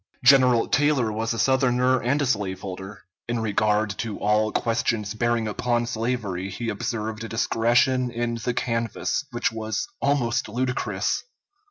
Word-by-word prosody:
General 125 Hz, -2 st, +6 dB
Taylor 145 Hz, -6 st, +2 dB
was 110 Hz, +2 st, -2 dB
a 115 Hz, -, -2 dB
Southerner 130 Hz, 0 st, +2 dB
and 130 Hz, +5 st, +1 dB
a -, -, +1 dB
slaveholder. 95 Hz, -3 st, -3 dB, 0.3 s
In 120 Hz, -1 st, 0 dB
regard 105 Hz, -1 st, +1 dB
to 110 Hz, -3 st, -3 dB
all 105 Hz, +1 st, +2 dB
questions 115 Hz, -2 st, 0 dB
bearing 120 Hz, 0 st, 0 dB
upon 120 Hz, +2 st, 0 dB
slavery, 110 Hz, -5 st, -2 dB
he 115 Hz, +5 st, -4 dB
observed 110 Hz, +1 st, -3 dB
a 115 Hz, -, -6 dB
discretion 120 Hz, +3 st, +2 dB
in 120 Hz, 0 st, -2 dB
the 125 Hz, -, -1 dB
canvass 115 Hz, +4 st, -1 dB
which 120 Hz, -2 st, -1 dB
was 110 Hz, -, -3 dB
almost 125 Hz, -5 st, +1 dB
ludicrous. 125 Hz, +3 st, -1 dB
115 Hz, 140 wpm, -24 LUFS, 110-125 Hz, 0.3 s, General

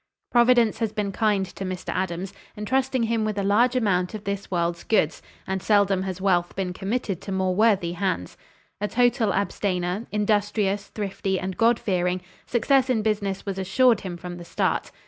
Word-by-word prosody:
Providence 240 Hz, -2 st, +4 dB
has 225 Hz, -3 st, 0 dB
been 210 Hz, -2 st, -2 dB
kind 205 Hz, -2 st, +1 dB
to 190 Hz, -, -8 dB
Mr. 185 Hz, -1 st, -5 dB
Adams, 185 Hz, +1 st, -3 dB, 0.2 s
entrusting 260 Hz, +3 st, 0 dB
him 225 Hz, -1 st, 0 dB
with 215 Hz, -1 st, -2 dB
a 200 Hz, -, 0 dB
large 235 Hz, +6 st, +3 dB
amount 195 Hz, -5 st, +1 dB
of 210 Hz, -, -7 dB
this 200 Hz, -1 st, -4 dB
world's 170 Hz, -1 st, -1 dB
goods, 170 Hz, -8 st, +1 dB, 0.2 s
and 190 Hz, 0 st, -2 dB
seldom 200 Hz, -2 st, +3 dB
has 190 Hz, -1 st, -4 dB
wealth 180 Hz, -3 st, +1 dB
been 185 Hz, -2 st, -2 dB
committed 195 Hz, -1 st, -3 dB
to 195 Hz, -, -7 dB
more 190 Hz, -1 st, 0 dB
worthy 200 Hz, -4 st, +3 dB
hands. 175 Hz, -, -2 dB, 0.5 s
A 210 Hz, -, +1 dB
total 245 Hz, -1 st, +2 dB
abstainer, 195 Hz, 0 st, -1 dB
industrious, 205 Hz, -1 st, 0 dB
thrifty 195 Hz, -2 st, -3 dB
and 190 Hz, 0 st, -4 dB
God 230 Hz, +4 st, +4 dB
fearing, 180 Hz, -2 st, 0 dB, 0.3 s
success 260 Hz, +2 st, +2 dB
in 225 Hz, -4 st, +1 dB
business 200 Hz, -3 st, -1 dB
was 195 Hz, -1 st, -3 dB
assured 220 Hz, +4 st, +3 dB
him 180 Hz, -3 st, -6 dB
from 175 Hz, 0 st, -7 dB
the 175 Hz, -, -8 dB
start. -, -, -1 dB
200 Hz, 175 wpm, -25 LUFS, 185-220 Hz, 0.5 s, Providence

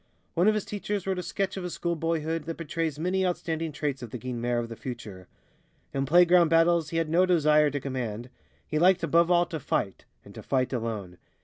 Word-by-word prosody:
One 175 Hz, +4 st, +2 dB
of 215 Hz, -, +4 dB
his 210 Hz, -, -2 dB
teachers 205 Hz, -1 st, -4 dB
wrote 190 Hz, -1 st, -1 dB
a -, -, -2 dB
sketch 195 Hz, +2 st, -3 dB
of 190 Hz, -, -4 dB
his 180 Hz, -, -4 dB
school 170 Hz, -1 st, -1 dB
boyhood 165 Hz, 0 st, -2 dB
that 165 Hz, 0 st, -5 dB
betrays 165 Hz, -2 st, -3 dB
many 180 Hz, +4 st, 0 dB
outstanding 165 Hz, -3 st, -2 dB
traits 145 Hz, -2 st, -3 dB
of 120 Hz, -, -7 dB
the 125 Hz, -, -6 dB
Guynemer 120 Hz, 0 st, -2 dB
of 120 Hz, -1 st, -2 dB
the 115 Hz, -, -8 dB
future. 105 Hz, -7 st, -8 dB, 0.7 s
In 135 Hz, 0 st, -1 dB
playground 175 Hz, +1 st, +5 dB
battles 165 Hz, -1 st, +3 dB
he 165 Hz, -, -3 dB
had 165 Hz, -1 st, +1 dB
no 170 Hz, +4 st, +3 dB
desire 150 Hz, -4 st, +4 dB
to 145 Hz, 0 st, -3 dB
command; 125 Hz, -3 st, -5 dB, 0.3 s
he 155 Hz, -, -1 dB
liked 180 Hz, +1 st, +4 dB
above 170 Hz, +1 st, +3 dB
all 175 Hz, -1 st, +4 dB
to 165 Hz, -2 st, -5 dB
fight, 100 Hz, -7 st, -2 dB, 0.2 s
and -, -, -13 dB
to -, -, -9 dB
fight 130 Hz, -1 st, 0 dB
alone. 110 Hz, -7 st, -4 dB
160 Hz, 215 wpm, -27 LUFS, 130-175 Hz, 0.7 s, playground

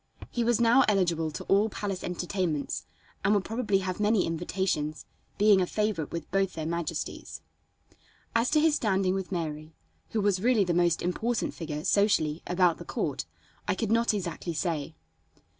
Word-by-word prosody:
He 240 Hz, -, 0 dB
was 235 Hz, 0 st, +2 dB
now 235 Hz, +3 st, +6 dB
eligible 175 Hz, -6 st, +2 dB
to 155 Hz, -, -6 dB
all 205 Hz, +3 st, +3 dB
palace 200 Hz, -2 st, -4 dB
entertainments, 180 Hz, -, -2 dB, 0.4 s
and 200 Hz, +2 st, +4 dB
would 200 Hz, -, +1 dB
probably 225 Hz, -3 st, 0 dB
have 185 Hz, +1 st, -3 dB
many 210 Hz, -1 st, +3 dB
invitations, 165 Hz, -2 st, -2 dB, 0.3 s
being 205 Hz, -2 st, +5 dB
a 180 Hz, -, +1 dB
favorite 210 Hz, -8 st, -1 dB
with 165 Hz, -2 st, -6 dB
both 195 Hz, -1 st, +1 dB
their 160 Hz, -1 st, -4 dB
majesties. 170 Hz, -1 st, -4 dB, 0.9 s
As 230 Hz, +2 st, +3 dB
to 305 Hz, -, +4 dB
his 315 Hz, 0 st, +4 dB
standing 195 Hz, -8 st, +1 dB
with 190 Hz, -1 st, -3 dB
Mary, 155 Hz, -3 st, -4 dB, 0.3 s
who 220 Hz, -, -1 dB
was 200 Hz, -2 st, +1 dB
really 235 Hz, -2 st, +4 dB
the 175 Hz, -2 st, 0 dB
most 175 Hz, -1 st, +2 dB
important 220 Hz, +6 st, -1 dB
figure, 150 Hz, -2 st, -5 dB
socially, 170 Hz, -7 st, +2 dB
about 180 Hz, -1 st, +2 dB
the -, -, -7 dB
court, 145 Hz, -4 st, -2 dB, 0.4 s
I -, -, +1 dB
could 220 Hz, +1 st, -2 dB
not 230 Hz, +1 st, +3 dB
exactly 175 Hz, -4 st, -3 dB
say. 160 Hz, -2 st, -2 dB
185 Hz, 165 wpm, -28 LUFS, 165-210 Hz, 0.9 s, now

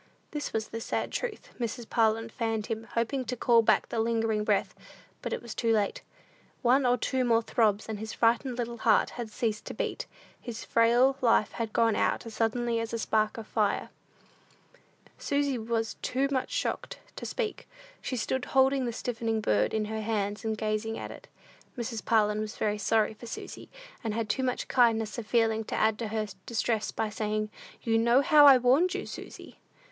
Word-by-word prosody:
This 295 Hz, -1 st, -4 dB
was 220 Hz, -1 st, -2 dB
the 230 Hz, -, -5 dB
sad -, -, -2 dB
truth. 475 Hz, -4 st, -4 dB
Mrs. 235 Hz, 0 st, -4 dB
Parlin 225 Hz, 0 st, +1 dB
fanned 225 Hz, -2 st, -2 dB
him, 225 Hz, -1 st, -4 dB
hoping 235 Hz, +3 st, 0 dB
to 250 Hz, -, -3 dB
call 235 Hz, 0 st, +5 dB
back 225 Hz, -, +3 dB
the 230 Hz, -, -2 dB
lingering 225 Hz, -1 st, +1 dB
breath. -, -, +1 dB, 0.5 s
But -, -, -4 dB
it -, -, -3 dB
was 235 Hz, -, -6 dB
too 230 Hz, -1 st, 0 dB
late. 210 Hz, -3 st, +1 dB, 0.6 s
One 255 Hz, +2 st, +4 dB
or 245 Hz, 0 st, +3 dB
two 260 Hz, +2 st, 0 dB
more 230 Hz, -2 st, +3 dB
throbs, 215 Hz, -3 st, +1 dB
and 220 Hz, -2 st, -4 dB
his 220 Hz, 0 st, -5 dB
frightened 240 Hz, +2 st, +1 dB
little 235 Hz, -1 st, -3 dB
heart 220 Hz, -1 st, +3 dB
had 240 Hz, -2 st, -6 dB
ceased 215 Hz, -2 st, -2 dB
to -, -, -6 dB
beat; -, -, -3 dB, 0.3 s
his 235 Hz, -2 st, -7 dB
frail 240 Hz, +4 st, +4 dB
life 230 Hz, -3 st, +3 dB
had 230 Hz, -2 st, -4 dB
gone 225 Hz, -1 st, +3 dB
out -, -, 0 dB
as 230 Hz, -, -8 dB
suddenly 230 Hz, +1 st, 0 dB
as 230 Hz, 0 st, -4 dB
a -, -, 0 dB
spark 215 Hz, -1 st, 0 dB
of 225 Hz, -, -6 dB
fire. 210 Hz, -2 st, 0 dB, 1.3 s
Susy 280 Hz, -3 st, 0 dB
was 225 Hz, 0 st, -1 dB
too 270 Hz, +2 st, 0 dB
much 260 Hz, -2 st, 0 dB
shocked -, -, -3 dB, 0.2 s
to -, -, -8 dB
speak. -, -, -3 dB, 0.3 s
She 255 Hz, -, -3 dB
stood 255 Hz, +3 st, -1 dB
holding 265 Hz, 0 st, +3 dB
the 235 Hz, -, -2 dB
stiffening 225 Hz, -2 st, -2 dB
bird 105 Hz, -, +1 dB
in 215 Hz, -1 st, 0 dB
her 220 Hz, +1 st, -4 dB
hands, 210 Hz, -2 st, -2 dB
and 220 Hz, -1 st, -1 dB
gazing 215 Hz, +1 st, -2 dB
at -, -, -6 dB
it. -, -, -12 dB, 0.5 s
Mrs. 230 Hz, -3 st, -4 dB
Parlin 210 Hz, -2 st, +2 dB
was 215 Hz, 0 st, -5 dB
very 210 Hz, -1 st, 0 dB
sorry 220 Hz, +1 st, +2 dB
for 235 Hz, +2 st, -11 dB
Susy, -, -, -8 dB, 0.3 s
and 220 Hz, -2 st, -2 dB
had 225 Hz, -2 st, -2 dB
too 265 Hz, -, 0 dB
much 255 Hz, -1 st, -1 dB
kindness 225 Hz, -2 st, +2 dB
of 220 Hz, -, -7 dB
feeling 225 Hz, -1 st, +2 dB
to -, -, -4 dB
add 220 Hz, -1 st, +2 dB
to 230 Hz, -, -2 dB
her 215 Hz, 0 st, -1 dB, 0.2 s
distress 225 Hz, -1 st, 0 dB
by 220 Hz, -1 st, -2 dB
saying, 215 Hz, 0 st, -2 dB, 0.3 s
"You 225 Hz, -1 st, +2 dB
know 235 Hz, +3 st, +4 dB
how 295 Hz, -1 st, +7 dB
I 270 Hz, -2 st, +9 dB
warned 265 Hz, +9 st, +3 dB
you, -, -, -3 dB
Susy." -, -, -10 dB
225 Hz, 195 wpm, -29 LUFS, 220-245 Hz, 1.3 s, I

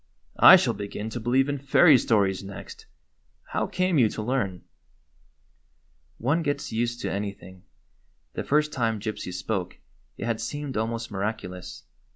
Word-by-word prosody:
"I -, -, +11 dB
shall -, -, +2 dB
begin 105 Hz, +2 st, -6 dB
to 120 Hz, -, -4 dB
believe 125 Hz, +4 st, +2 dB
in 145 Hz, -1 st, -2 dB
fairy 140 Hz, +3 st, +6 dB
stories 100 Hz, -5 st, +1 dB
next. 100 Hz, 0 st, -10 dB, 0.6 s
How -, -, -2 dB
came 185 Hz, -4 st, +1 dB
you 115 Hz, -4 st, +4 dB
to 110 Hz, -, -5 dB
learn 105 Hz, -7 st, -2 dB, 0.8 s
?" 65 Hz, 0 st, -41 dB
One 145 Hz, +8 st, +1 dB
gets 145 Hz, -2 st, -2 dB
used 120 Hz, +1 st, -2 dB
to -, -, -2 dB
anything. 100 Hz, -2 st, -6 dB, 0.7 s
The -, -, -4 dB
first 150 Hz, +1 st, +1 dB
time 115 Hz, -4 st, 0 dB
Gypsy 110 Hz, -3 st, -5 dB
spoke 90 Hz, 0 st, -3 dB, 0.4 s
it -, -, -5 dB
had 115 Hz, -2 st, -2 dB
seemed 145 Hz, +3 st, -5 dB
almost 115 Hz, +1 st, -3 dB
miraculous. 95 Hz, -3 st, -5 dB
110 Hz, 150 wpm, -26 LUFS, 100-130 Hz, 0.8 s, I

